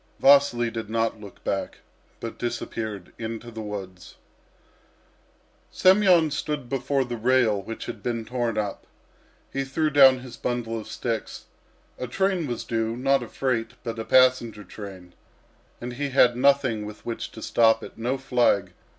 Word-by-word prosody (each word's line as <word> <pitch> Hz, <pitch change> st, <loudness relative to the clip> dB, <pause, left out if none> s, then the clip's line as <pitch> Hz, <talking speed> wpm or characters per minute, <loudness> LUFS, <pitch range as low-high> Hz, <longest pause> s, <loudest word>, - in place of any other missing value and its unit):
Vasily 135 Hz, -4 st, +5 dB
did 115 Hz, -2 st, -5 dB
not 115 Hz, -1 st, -1 dB
look 100 Hz, -3 st, -12 dB
back, -, -, -2 dB, 0.4 s
but 115 Hz, -, -7 dB
disappeared 110 Hz, -5 st, -4 dB
into 115 Hz, +1 st, -5 dB
the 110 Hz, -1 st, -7 dB
woods. 95 Hz, -4 st, -7 dB, 1.5 s
Semyon 185 Hz, -5 st, +5 dB
stood 145 Hz, -2 st, -3 dB
before 135 Hz, +1 st, 0 dB
the 120 Hz, -1 st, -5 dB
rail 115 Hz, -3 st, +2 dB
which 115 Hz, +3 st, -7 dB
had -, -, -7 dB
been 115 Hz, -2 st, -3 dB
torn 120 Hz, -2 st, -2 dB
up. 105 Hz, -2 st, -3 dB, 0.7 s
He 135 Hz, -, -1 dB
threw 155 Hz, +3 st, -1 dB
down 135 Hz, -3 st, +7 dB
his 125 Hz, -1 st, -10 dB
bundle 115 Hz, -2 st, -2 dB
of 110 Hz, -, -9 dB
sticks. 115 Hz, -3 st, -4 dB, 0.5 s
A 125 Hz, -, -3 dB
train 185 Hz, +3 st, 0 dB
was 120 Hz, -2 st, -3 dB
due; 115 Hz, 0 st, -2 dB
not 135 Hz, +1 st, +2 dB
a 120 Hz, -, -6 dB
freight, 115 Hz, -2 st, -2 dB
but 115 Hz, -1 st, -4 dB
a -, -, -2 dB
passenger 125 Hz, -4 st, +3 dB
train. 95 Hz, -2 st, -10 dB, 0.7 s
And 120 Hz, +1 st, -6 dB
he 140 Hz, +3 st, -3 dB
had 125 Hz, -2 st, +5 dB
nothing 130 Hz, -4 st, +3 dB
with 105 Hz, 0 st, -11 dB
which 115 Hz, -1 st, -4 dB
to 110 Hz, -, -9 dB
stop 115 Hz, -1 st, +3 dB
it, -, -, -10 dB
no 125 Hz, +4 st, -1 dB
flag. 120 Hz, -8 st, +1 dB
120 Hz, 155 wpm, -25 LUFS, 110-135 Hz, 1.5 s, down